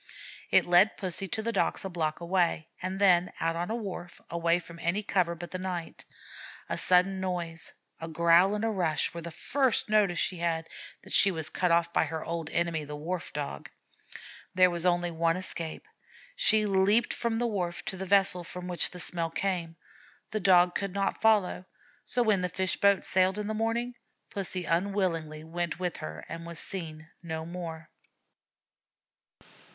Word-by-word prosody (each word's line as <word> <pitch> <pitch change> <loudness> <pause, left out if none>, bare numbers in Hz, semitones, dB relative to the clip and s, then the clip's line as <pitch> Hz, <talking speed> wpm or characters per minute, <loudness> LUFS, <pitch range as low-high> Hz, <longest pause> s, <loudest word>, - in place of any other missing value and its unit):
It - - +5
led 180 +5 +5
Pussy 190 +1 -3
to 220 +4 -3
the 230 - 0
docks 220 - 0
a - - -3
block 160 -3 -2
away, 170 -2 0
and 185 +1 -3
then 180 -3 +4
out 165 0 0
on 175 +3 -3
a 225 - -1
wharf, 185 -6 -6
away 170 0 +2
from 170 -1 -10
any 175 +5 0
cover 180 -4 +1
but 175 +1 -8
the 185 - -4
night. 180 -3 -5 0.6
A - - -1
sudden 185 +1 +3
noise, 175 -3 -3 0.3
a 165 - -6
growl 170 +4 +4
and 210 +2 -1
a - - +1
rush, 175 -8 +1
were 170 - -6
the 170 - -6
first 255 - 0
notice 200 -5 +3
she 180 +1 0
had 165 -1 -1 0.4
that - - -8
she 200 - +6
was 160 -4 -2
cut 180 - 0
off 170 0 +2
by - - +3
her 160 +1 -5
old 165 -2 -4
enemy, 170 -2 -1
the 150 0 -7
Wharf 165 +4 -4
Dog. 140 - -5 0.9
There 185 -1 +6
was 170 +1 0
only 175 -1 +1
one 165 +1 +1
escape. 170 - -3 0.5
She 220 - +4
leaped 200 +3 +3
from 235 -1 -1
the 240 +2 0
wharf 180 -6 -2
to - - -2
the 190 0 -6
vessel 195 -2 +4
from 180 +1 -7
which 180 -1 +1
the 180 - -9
smell 170 -1 -1
came. 170 -1 -2 0.6
The 215 - -1
Dog 180 -2 +5
could 200 -1 -3
not 195 0 -1
follow, 210 -4 +3 0.4
so 245 - +1
when 210 -4 +3
the 180 - -1
fish 185 +1 -1
boat 200 -1 +3
sailed 185 +1 +3
in 210 - -3
the 215 - -2
morning 225 +3 -1 0.4
Pussy 185 -2 -3
unwillingly 165 -4 -1
went 170 0 -3
with 180 -2 -3
her 80 0 -7
and 165 - -7
was 170 0 -8
seen 160 -4 -4
no 160 -2 -5
more. 165 -2 -7
180 Hz, 180 wpm, -29 LUFS, 165-195 Hz, 0.9 s, she